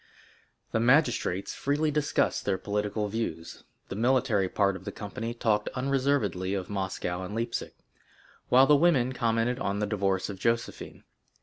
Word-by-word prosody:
The 115 - +1
magistrates 120 - +2
freely 150 +2 0
discussed 150 -1 0
their 95 - 0
political 105 +1 -2
views; 100 -7 -5 0.3
the - - -4
military 115 -4 +2
part 100 -1 +1
of 95 - -9
the - - -5
company 110 +2 -5
talked 105 -3 +1
unreservedly 130 -8 0
of 95 +1 -4
Moscow 95 -2 -3
and 95 +3 -6
Leipsic, 115 +1 -3 0.7
while 130 +2 +7
the 150 - +6
women 140 -5 +3
commented 120 0 0
on 100 -5 -1
the 105 - 0
divorce 100 -2 0
of 100 -2 -7
Josephine. 115 +2 -2
115 Hz, 145 wpm, -28 LUFS, 100-130 Hz, 0.7 s, while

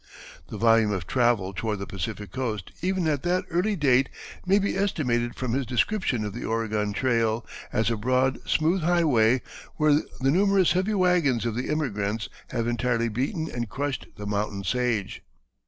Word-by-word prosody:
The - - -7
volume 115 -1 +4
of 95 -3 -2
travel 120 -5 +1
toward 105 +3 -2
the 100 - -5
Pacific 105 +2 -5
Coast 115 -7 -3
even 185 -1 0
at 145 -3 0
that 180 +1 0
early 185 +5 +1
date 135 -5 +3 0.4
may 195 +2 +5
be 200 0 0
estimated 125 -12 0
from 125 -3 -3
his 135 -1 -1
description 125 - 0
of 105 - -4
the 120 - -6
Oregon 110 -2 -1
trail 115 -1 +1 0.3
as 110 +1 +1
"a 115 - -1
broad 130 +4 +1
smooth 165 +4 +2
highway 140 -9 +3 0.3
where 150 -1 +3 0.3
the 135 +1 +2
numerous 195 +1 +3
heavy 190 +4 +1
wagons 175 - +2
of 115 - -1
the 125 +3 -3
emigrants 110 -8 -1 0.2
have 115 -3 -2
entirely 120 0 0
beaten 140 - -2
and 120 -2 -4
crushed 140 +3 -3
the 105 - -6
mountain 100 -1 -2
sage." 115 -1 -1
125 Hz, 170 wpm, -26 LUFS, 110-155 Hz, 0.4 s, may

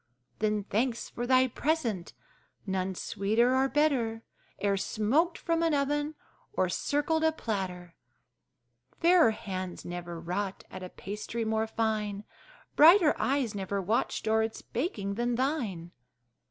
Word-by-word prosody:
Then 210 -1 +1
thanks 230 +4 -1
for 240 0 -4
thy 260 0 +5
present! 245 - -1 0.5
none 190 -1 -2
sweeter 220 +8 +1
or 265 +1 +3
better 255 -7 +1 0.4
E'er 200 -1 +1
smoked 250 - +1
from 330 -1 0
an 330 -2 +2
oven 295 +2 0 0.4
or 185 - +1
circled 295 - 0
a 320 - +4
platter! 185 - -4 1.1
Fairer 340 -6 +6
hands 185 -5 -5
never 175 -1 -6
wrought 185 +4 -3
at 185 - -7
a 185 - -6
pastry 210 +5 -5
more 220 0 0
fine, 215 -2 -1 0.5
Brighter 330 +1 +7
eyes 265 -5 +1
never 200 0 -2
watched 215 +3 -1
o'er 220 0 +3
its 220 0 -3
baking, 225 - -3
than 240 +3 0
thine! 230 - -2
220 Hz, 130 wpm, -29 LUFS, 195-280 Hz, 1.1 s, Brighter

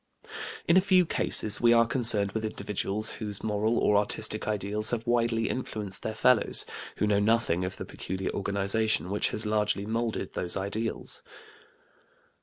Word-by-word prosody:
In 170 - +4
a - - +5
few 185 -2 +2
cases 110 -8 +6
we 120 0 +4
are 115 0 +4
concerned 110 -5 +1
with 110 +2 -5
individuals 105 0 -4
whose 105 -2 -7
moral 110 +2 -1
or 105 - +2
artistic 105 +1 -1
ideals 105 0 -1
have 115 -1 -4
widely 115 -1 0
influenced 105 -6 -4
their 110 - -5
fellows, 125 0 +4 0.3
who - - 0
know 105 -1 +1
nothing 105 -5 0
of 90 - -5
the - - -7
peculiar 95 +1 -6
organization 100 0 -1
which 100 - 0
has 110 +1 -1
largely 105 -1 -1
molded 115 +1 -4
those 90 +2 -2
ideals. 105 +4 -2
110 Hz, 155 wpm, -26 LUFS, 100-115 Hz, 0.3 s, cases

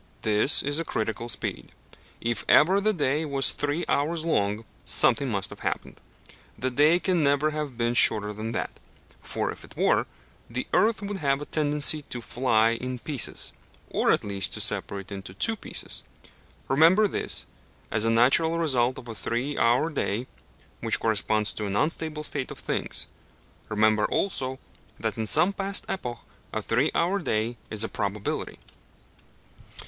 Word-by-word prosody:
This 110 +6 +2
is 145 +2 +1
a - - -1
critical 110 -4 -3
speed. 100 - -3 0.5
If 115 -2 -2
ever 190 +6 +5
the 215 +1 +2
day 150 -4 0
was 140 -3 +2
three 145 +3 -2
hours 160 +3 0
long, 105 -7 0 0.2
something 140 - +4
must 100 -3 -2
have - - -10
happened. - - -4 0.6
The 130 +1 -2
day 150 +6 +5
can 180 -2 +1
never 145 +1 +2
have 150 -5 -5
been 120 0 0
shorter 105 -3 +5
than 110 +2 -5
that; - - -4 0.4
for - - -3
if - - -11
it - - -15
were, - - +2 0.4
the 125 +2 -3
earth 220 -1 +2
would 200 0 -4
have 140 -5 0
a 145 - -6
tendency 150 0 +3
to 120 - -4
fly 115 -2 +2
in 125 +2 -4
pieces, 135 0 -1 0.4
or, - - +1
at - - +1
least, 100 -2 0
to - - -3
separate 100 0 -1
into 95 -1 -8
two 225 - +1
pieces. - - -3 0.7
Remember 165 +10 +5
this, - - -2 0.5
as 105 0 +2
a 115 - +2
natural 135 +9 +4
result 130 -6 +2
of 120 - -10
a 115 - -6
three 120 +6 -3
hour 120 +8 +2
day, 120 -4 -2 0.5
which - - -1
corresponds 110 -1 +1
to 105 - -4
an 100 - -3
unstable 155 +3 -1
state 140 -3 -3
of - - -8
things; - - -3 0.6
remember 110 0 +2
also 130 -9 -1 0.4
that - - -2
in 110 -1 -2
some 175 - +5
past 195 0 -2
epoch 125 -10 -4 0.3
a 110 - -2
three 125 +9 +1
hour 185 +4 +1
day 115 - -1
is 110 0 +2
a - - -1
probability. 100 -1 -3
130 Hz, 165 wpm, -26 LUFS, 110-155 Hz, 0.7 s, ever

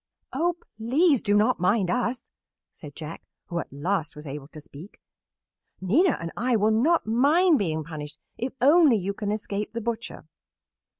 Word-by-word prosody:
"Oh, 340 +6 0 0.2
please 275 +5 +3
do 205 -1 +1
not 210 -2 +3
mind 185 0 +2
us," 245 0 -2 0.4
said 145 -3 -12
Jack, 160 0 -8 0.3
who 170 - -2
at - - -7
last 155 +3 -2
was 150 +1 -10
able 140 0 -7
to 155 - -12
speak. 150 +6 -13 0.8
"Nina 275 - +2
and 165 0 -5
I 245 +2 +1
will 215 0 +3
not 300 +10 +2
mind 295 +9 +4
being 160 -5 -1
punished 150 -2 -8 0.2
if 250 +3 -3
only 290 -2 +6
you 200 0 -3
can 205 0 -3
escape 210 0 -4
the 230 - -3
butcher." 230 0 -5
210 Hz, 165 wpm, -25 LUFS, 170-255 Hz, 0.8 s, only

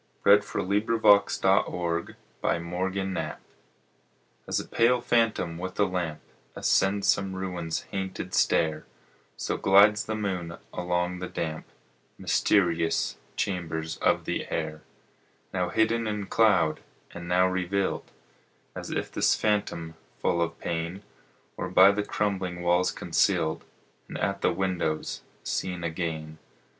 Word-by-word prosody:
Henry 100 +1 +8
Wadsworth 105 +1 +2
Longfellow 90 -3 0
Moonlight 90 -1 -2 1.1
AS - - 0
a - - -7
pale 120 +2 +3
phantom 115 -8 +1
with 95 +2 -6
a 105 - +5
lamp 85 -5 -3 0.3
Ascends 100 +1 +2
some 95 -1 +2
ruin's 90 -3 -3
hainted 95 -1 -4
stair, 80 -2 +2 0.5
So - - -2
glides 105 +2 +5
the 110 - -2
moon 90 -5 -3 0.2
along 90 0 -1
the 90 - -4
damp 80 -3 -4 0.5
Mysterious 85 -5 +1 0.2
chambers 80 -4 -2
of - - +1
the - - -2
air. 80 -1 -3 0.7
Now 90 -2 0
hidden 110 +3 +1
in 105 -1 -2
cloud, 95 -8 +3 0.3
and 85 0 -8
now 90 +1 +4
revealed, 95 +1 -1 0.6
As - - -7
if - - -3
this - - +3
phantom, 100 -6 -1 0.3
full 85 - +1
of 85 0 -1
pain, 85 +4 -3 0.5
Were - - -3
by 95 +2 +7
the 105 +1 -1
crumbling 95 -4 -2
walls 90 +1 +3
concealed, 85 -2 +1 0.4
And - - -6
at - - -1
the - - +3
windows 90 -4 -2 0.2
seen 90 -2 -3
again. 80 -2 -4
90 Hz, 120 wpm, -27 LUFS, 85-100 Hz, 1.1 s, Henry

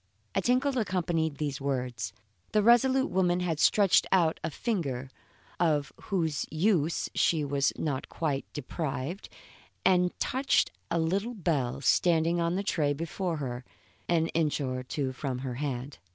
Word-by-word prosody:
A - - +1
tinkle 255 +2 +2
accompanied 170 -7 0
these 145 -3 -3
words. 125 -7 -2 0.4
The 210 - +4
resolute 260 +4 +4
woman 180 -1 +2
had 165 -4 -1
stretched 200 +1 +4
out 170 -4 +3
a 160 - -1
finger, 140 - -3 0.5
of 155 -4 +1
whose 165 -7 -1
use 165 -1 +1
she 155 -3 +2
was 140 -1 +1
not 140 -4 -2
quite 145 -4 -2
deprived, 150 +3 -4 0.6
and 180 -1 +3
touched 265 +2 +2 0.2
a 170 - 0
little 195 +9 0
bell 140 - -1
standing 170 +2 +3
on 170 +1 +1
the 195 - -1
tray 150 -7 +1
before 165 +3 -3
her, 125 -3 -4 0.5
an 165 -1 +2
inch 155 -3 0
or 130 -2 -2
two 130 +1 -3
from 130 -1 -4
her 125 - -3
hand. 135 -1 -4
160 Hz, 145 wpm, -29 LUFS, 140-185 Hz, 0.6 s, The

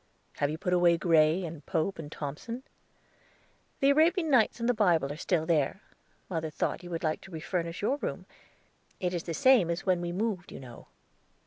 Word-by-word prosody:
"Have 145 - +1
you 155 - -3
put 180 +1 -1
away 175 -1 +4
Gray, 165 +1 +3
and 160 -2 -8
Pope, 180 +2 -1
and 150 -2 -7
Thomson?" 160 - -6 1.2
"The 275 +1 +5
Arabian 320 +2 +3
Nights 240 -3 +3
and 235 - -1
the 245 - +4
Bible 170 - +2
are - - -8
still 160 0 0
there. 160 +3 0 0.4
Mother 160 -3 -3
thought 155 - -2
you 175 - -10
would 165 -1 -4
like 155 -1 -1
to - - -13
refurnish 170 +2 -3
your 270 +7 +1
room. - - -4 0.7
It 180 -2 -1
is 175 - -1
the 165 - -3
same 255 -8 +5
as 170 +3 -2
when 185 -2 +2
we 175 0 -3
moved, 195 -1 -2
you - - -8
know." 125 -3 -12
175 Hz, 195 wpm, -29 LUFS, 160-205 Hz, 1.2 s, The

